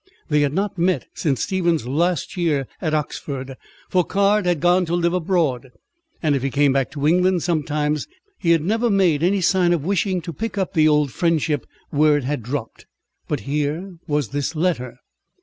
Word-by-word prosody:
They 150 -1 +3
had 145 -1 +1
not 195 0 -2
met 180 +2 +1
since 135 -7 -1
Stephen's 175 - 0
last 165 +5 0
year 155 -7 0
at 155 -3 0
Oxford, 135 -3 -4 0.3
for 185 -2 +2
Caird 200 +1 +2
had 175 -3 +1
gone 175 +2 +3
to 170 - 0
live 170 0 +1
abroad, 160 -8 0 0.5
and 150 -3 +2
if 135 - -1
he 135 - -1
came 140 0 +3
back 135 -2 +1
to 145 -2 -3
England 180 +2 +3
sometimes, 150 -3 -1 0.3
he 170 - -1
had 165 -2 +4
never 225 +6 +1
made 185 -7 +3
any 190 +3 +2
sign 175 0 +3
of 160 -4 -2
wishing 190 0 0
to 170 0 -6
pick 205 +4 -5
up 190 -2 -1
the 155 -1 +4
old 150 -3 +2
friendship 160 -4 0 0.2
where 150 0 +4
it 145 - -3
had 140 0 -2
dropped. 120 0 -6 0.4
But 145 -6 -2
here 150 - -3
was 145 -5 0
this 145 +3 -3
letter. 155 -8 -1
160 Hz, 185 wpm, -21 LUFS, 145-180 Hz, 0.5 s, had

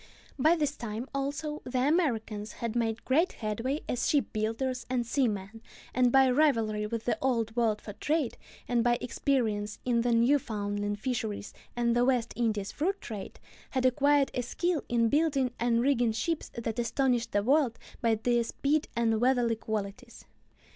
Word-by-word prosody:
By 315 +6 +5
this 295 -3 -1
time, 230 +1 -5
also, 285 +2 -3
the 250 0 -1
Americans 225 -10 0
had 235 -1 -4
made 225 -1 -1
great 315 +8 +2
headway 230 +7 -2
as 245 - 0
ship 280 -7 +1
builders 230 +4 -1
and 250 -2 0
seamen, 225 -4 -1 0.3
and 250 -1 +3
by 270 0 +6
rivalry 225 -7 +2
with 230 0 -4
the 230 -3 0
Old 230 -4 0
World 225 -3 +1
for 205 - -8
trade, 300 +2 -1 0.3
and 240 -1 +2
by 240 0 +3
experience 225 -5 -1
in 240 -2 +2
the 240 +1 +1
Newfoundland 210 -5 +1
fisheries 220 -4 -3 0.2
and 235 -1 +1
the 240 - +3
West 245 -2 +1
Indies 215 -4 -1
fruit 380 +6 -1
trade, 210 -4 -7 0.3
had 260 -1 -1
acquired 280 +2 +3
a 250 - -1
skill 340 +6 -1
in 235 -1 +3
building 280 -2 +2
and 235 0 +2
rigging 245 -4 +2
ships 310 +9 -2
that 230 0 -3
astonished 240 0 +1
the 205 0 +1
world 265 -1 +2 0.2
by 230 -2 +3
their 240 +2 +1
speed 290 +6 0
and 225 -1 +1
weatherly 245 -2 +3
qualities. 220 +2 -5
240 Hz, 160 wpm, -29 LUFS, 225-270 Hz, 0.3 s, by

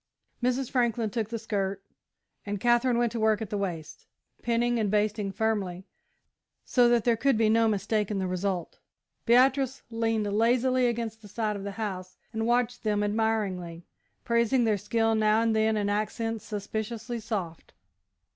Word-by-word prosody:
Mrs. 250 +1 0
Franklin 235 -3 +1
took 220 0 -2
the 230 - -3
skirt 200 -3 -3 0.6
and 205 -1 -4
Katherine 240 +2 +3
went 240 -1 +1
to 235 - -3
work 220 -1 +3
at 220 - -6
the 205 - -1
waist, 165 -5 -5 0.3
pinning 240 0 +1
and 210 -2 0
basting 210 -1 0
firmly, 195 -4 -2 0.8
so 245 -2 +4
that 240 -2 +3
there 235 0 +3
could 270 +1 +2
be 220 -1 +3
no 225 +1 +4
mistake 210 0 0
in 210 - -2
the 190 - -1
result. 185 -1 -3 0.5
Beatrice 265 +2 +3
leaned 225 -1 0
lazily 250 +3 +3
against 230 -2 -3
the 210 - -12
side 210 +1 -2
of 200 - -6
the 200 0 -5
house 190 -4 -5 0.2
and 225 0 -1
watched 245 0 +1
them 210 -1 0
admiringly, 205 -6 -1 0.4
praising 235 +2 +2
their 215 -3 +1
skill 225 +2 +1
now 215 0 +3
and 225 -1 +1
then 220 0 +2
in 205 -1 0
accents 215 +2 -2
suspiciously 220 +3 -4
soft. 195 -7 -5
220 Hz, 165 wpm, -28 LUFS, 205-235 Hz, 0.8 s, so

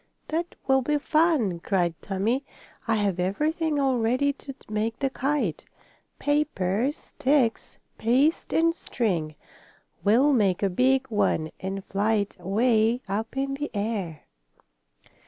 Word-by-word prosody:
"That 335 +2 -2
will 265 0 +4
be 295 +4 +1
fun!" 295 - +2
cried 175 -2 0
Tommie. 215 +8 -1 0.4
"I 225 - +2
have 200 -4 0
everything 300 - 0
all 265 -3 +2
ready 255 +5 +2
to 275 -1 -10
make 215 +2 -2
the 270 -1 -1
kite 265 - -1 0.5
paper, 265 -7 +1
sticks, 275 -5 0 0.2
paste 260 +8 +2
and 330 +1 +3
string. 175 - -2 0.7
We'll 250 +8 +4
make 200 -6 +2
a 195 - +2
big 260 +6 +2
one 160 -7 +1
and 190 +1 -5
fly 205 +3 0
it 205 -1 -2
away 220 +5 +2
up 220 +6 -3
in 275 0 -1
the 290 +2 -3
air." 200 -7 -3
230 Hz, 130 wpm, -26 LUFS, 200-280 Hz, 0.7 s, will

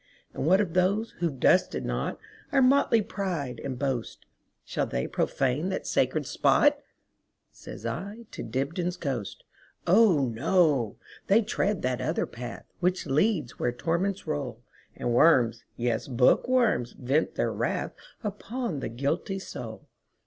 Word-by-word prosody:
And 140 - -2
what 190 +3 +5
of 190 -6 0
those 200 +5 +2
who 170 -1 +1
've 135 -4 -10
dusted 180 - +3
notOur - - -2 0.5
motley 255 -4 +4
pride 175 - -3
and 130 -2 -4
boast,—Shall 130 -3 -4
they 60 - -2
profane 135 +7 0
that 190 - -3
sacred - - +1
spot?"Says 290 0 -1
I 210 +4 -5
to - - -7
Dibdin's 165 - -2
ghost."Oh, 150 - 0
no! 140 - +2 0.3
they 215 +4 +5
tread 205 -2 -1
that 125 -1 0
other - - 0
path, 120 0 -8
Which 180 +1 0
leads 150 - +1
where 120 - +1
torments 175 +9 -1
roll, 140 -6 -4 0.3
And 120 - -1
worms, 120 -5 +4
yes, 120 -2 -1
bookworms, 130 - +3
vent 135 +5 0
their - - 0
wrathUpon 225 - -4
the - - -3
guilty 140 - -2
soul. 190 - -8
165 Hz, 125 wpm, -27 LUFS, 125-195 Hz, 0.5 s, what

